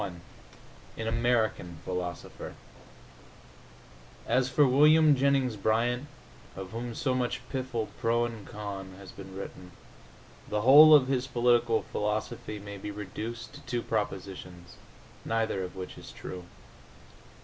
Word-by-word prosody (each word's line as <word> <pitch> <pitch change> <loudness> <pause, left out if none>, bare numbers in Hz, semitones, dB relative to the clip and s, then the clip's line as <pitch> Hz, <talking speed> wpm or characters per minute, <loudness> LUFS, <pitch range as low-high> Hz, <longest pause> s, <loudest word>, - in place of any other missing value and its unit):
XXI 95 -3 -4 0.8
AN 110 - -3
AMERICAN 115 -7 0
PHILOSOPHER 90 -2 -5 1.7
As 130 0 +2
for 145 +2 +4
William 150 +3 +6
Jennings 135 -3 +2
Bryan, 120 +6 +1 0.5
of 95 0 -7
whom 115 0 -5
so 130 - 0
much 125 -1 -2
piffle, 125 -4 -2
pro 120 0 +2
and 115 -3 -7
con, 100 -4 -7
has 95 -2 -11
been 95 -1 -11
written, 90 -2 -8 0.8
the 105 0 0
whole 150 +6 +10
of 135 -3 +5
his 130 -1 0
political 120 -2 +3
philosophy 105 0 -3
may 100 0 -8
be 105 - -6
reduced 110 +4 -6
to 145 - -11
two 120 -4 -3
propositions, 95 -4 -4 0.5
neither 110 -4 0
of 90 0 -7
which 95 -1 -7
is - - -11
true. 90 -1 -8
115 Hz, 125 wpm, -29 LUFS, 100-125 Hz, 1.7 s, whole